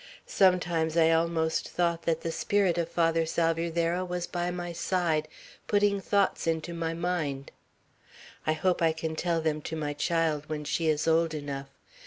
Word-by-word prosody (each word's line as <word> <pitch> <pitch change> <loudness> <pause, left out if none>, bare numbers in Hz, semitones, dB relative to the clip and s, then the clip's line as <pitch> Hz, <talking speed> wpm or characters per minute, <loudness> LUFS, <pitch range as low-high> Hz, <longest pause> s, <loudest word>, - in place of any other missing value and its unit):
Sometimes 175 -4 +2
I 165 -1 +5
almost 165 -1 +1
thought 170 -1 0
that 165 -1 +1
the 165 - -2
spirit 190 0 +1
of 170 -1 -1
Father 165 -1 +2
Salvierderra 165 +2 0
was 180 -1 -3
by 175 0 -2
my 175 -1 -4
side 165 -3 0 0.4
putting 205 -1 +2
thoughts 200 -3 +1
into 165 +1 -1
my 165 -1 -2
mind. 160 -6 -2 1.0
I 155 - +3
hope 175 +3 0
I 165 -1 +3
can 160 0 -4
tell 170 0 0
them 155 -1 -1
to 160 - -5
my 150 -2 -2
child 155 -1 0
when 150 -1 -3
she 160 +2 -1
is 155 0 +1
old 165 0 +2
enough. 140 -2 -5
165 Hz, 165 wpm, -28 LUFS, 160-175 Hz, 1.0 s, I